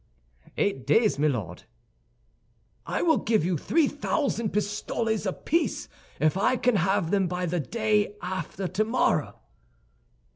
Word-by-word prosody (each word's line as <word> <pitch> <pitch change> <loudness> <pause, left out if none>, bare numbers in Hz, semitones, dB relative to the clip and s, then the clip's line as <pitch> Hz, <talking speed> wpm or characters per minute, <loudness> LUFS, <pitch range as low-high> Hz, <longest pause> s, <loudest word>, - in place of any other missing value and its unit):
"Eight 195 -11 -1
days, 220 -9 +3
my 150 - +3
Lord." 105 - -3 1.2
"I - - -1
will 320 -2 +4
give 215 -7 +1
you 180 0 +1
three 305 - +2
thousand 280 -6 -1
pistoles 210 +1 -1
apiece 320 - -1 0.3
if 155 +1 +2
I 225 +6 +2
can 245 -2 +2
have 180 -2 +1
them 195 -2 +2
by 180 +1 -2
the 175 +1 -1
day 210 - 0
after 185 +1 -4
tomorrow." 215 +7 0
205 Hz, 125 wpm, -26 LUFS, 180-225 Hz, 1.2 s, will